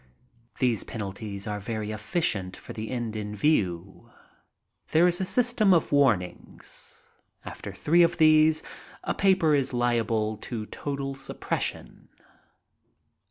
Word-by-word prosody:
These 120 -5 +1
penalties 100 -1 -6
are 105 -1 -3
very 110 0 -4
efficient 105 - -1
for - - -10
Ac 110 -1 -6
end 120 -3 -3
in 105 -1 -4
view. 100 - 0 0.8
There 165 +3 +5
is 175 +1 +1
a - - 0
system 225 -3 +3
of 165 - 0
warnings: 120 -11 -1 0.4
after - - -7
three 170 +3 +3
of 170 0 +3
these 155 -1 +5 0.4
a - - -1
paper 185 -5 +3
is 140 -3 +1
liable 115 -3 0
to 110 0 -6
total 140 +3 -4
suppression. 135 - -4
120 Hz, 120 wpm, -27 LUFS, 105-155 Hz, 0.8 s, There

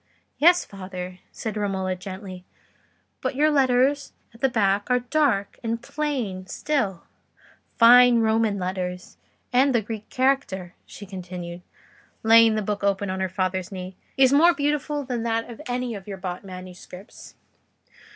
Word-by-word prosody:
"Yes, 350 +3 +5
father," 185 -2 -8
said 220 -2 -5
Romola, 190 -3 -1
gently; 185 0 -8 0.8
"but - - -2
your 305 +3 +3
letters 275 0 +2 0.2
at 230 - -18
the 270 - +3
back 205 -3 +1
are 250 0 +3
dark 245 -6 0
and 230 0 -2
plain 235 -10 -3
still—fine 245 - +2
Roman 220 -2 +2
letters; 180 -1 -4 0.4
and 260 +1 +4
the 235 - +3
Greek 215 0 -7
character," 255 -9 0
she 205 - -10
continued, 180 -2 -7 0.6
laying 225 0 +6
the 215 - -1
book 205 0 -3
open 200 -1 0
on 190 - -3
her 190 0 -1
father's 185 +1 -2
knee, 185 -1 -7 0.2
"is 265 0 +5
more 335 +4 +6
beautiful 295 0 -1
than 250 -3 -3
that 230 0 -1
of 235 +3 -10
any 250 -1 -2
of 200 -2 -9
your 195 -2 -6
bought 185 0 -5
manuscripts." 185 0 -11
215 Hz, 140 wpm, -24 LUFS, 185-250 Hz, 0.8 s, laying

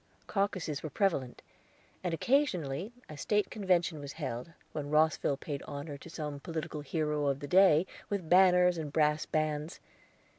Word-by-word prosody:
Caucuses 185 -7 -1
were 155 - -5
prevalent, 140 -7 -1 0.6
and 180 - -1
occasionally 185 - 0 0.2
a 155 - -9
State 210 +6 0
Convention 180 -6 +1
was 145 -1 -7
held, 140 -1 -5 0.2
when 145 -2 -4
Rosville 150 -2 +2
paid 145 0 -5
honor 145 +1 -6
to 140 +4 -11
some 150 -3 -5
political 160 0 -5
hero 150 0 -1
of 140 -1 0
the 145 - -6
day 180 -1 +6 0.2
with 200 -5 -2
banners 180 -1 +5
and 150 -2 -4
brass 150 0 +2
bands. 155 +1 -1
155 Hz, 150 wpm, -31 LUFS, 145-180 Hz, 0.6 s, day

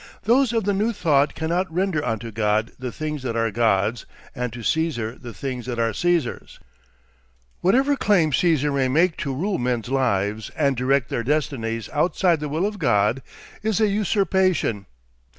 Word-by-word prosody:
Those 245 +2 +3
of 225 -2 0
the 205 +1 +1
new 215 +4 0
thought 150 -7 +2
cannot 170 +3 -1
render 175 -3 0
unto 115 -3 -3
God 110 +1 0
the 125 -1 -4
things 150 0 -4
that 125 -3 -3
are 115 -1 0
God's, 110 0 +1 0.3
and 125 -3 -3
to 120 0 -8
Caesar 125 -7 -1
the 120 -2 -10
things 125 0 -5
that 120 -2 -3
are 115 -1 0
Caesar's. 170 - -1 1.0
Whatever 265 +9 +3
claim 180 - +2
Caesar 150 -2 +2
may 135 -2 +1
make 165 +6 +2
to 140 - -3
rule 185 +9 -1
men's 120 -2 -1
lives 110 -5 0
and 140 -3 +2
direct 130 +1 +1
their - - -1
destinies 115 -6 -1
outside 170 +2 +1
the 150 0 -4
will 160 +6 0
of 210 0 -3
God, 120 - +2 0.4
is 215 -1 0
a 215 - +4
usurpation. 190 - +1
140 Hz, 170 wpm, -23 LUFS, 115-180 Hz, 1.0 s, a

